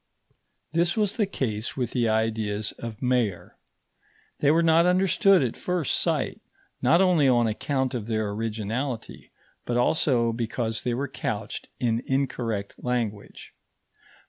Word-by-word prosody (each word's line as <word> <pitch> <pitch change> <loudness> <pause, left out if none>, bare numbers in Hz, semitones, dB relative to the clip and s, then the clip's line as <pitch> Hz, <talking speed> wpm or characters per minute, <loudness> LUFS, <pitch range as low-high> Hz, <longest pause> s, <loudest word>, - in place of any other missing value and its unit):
This 170 +5 +1
was 210 -2 +1
the 210 -4 +1
case 110 - -3
with 125 -3 -1
the 120 -3 +1
ideas 110 -1 0
of 115 0 -7
Mayer. 120 -7 0 0.8
They 145 - +3
were 165 +3 +4
not 165 +1 +5
understood 190 0 +4
at 120 - -2
first 180 -6 -1
sight, - - -1 0.4
not 170 - +4
only 175 -7 +4
on 120 -2 +4
account 130 +4 -1
of 115 -4 -4
their 110 -2 -1
originality, 115 +3 -4 0.3
but 120 - -1
also 120 -3 +2
because 115 -1 -2
they 120 -1 -1
were 140 +3 -2
couched - - -4
in 115 -1 +1
incorrect 120 -7 -2
language. 115 -5 -3
120 Hz, 135 wpm, -26 LUFS, 110-150 Hz, 0.8 s, not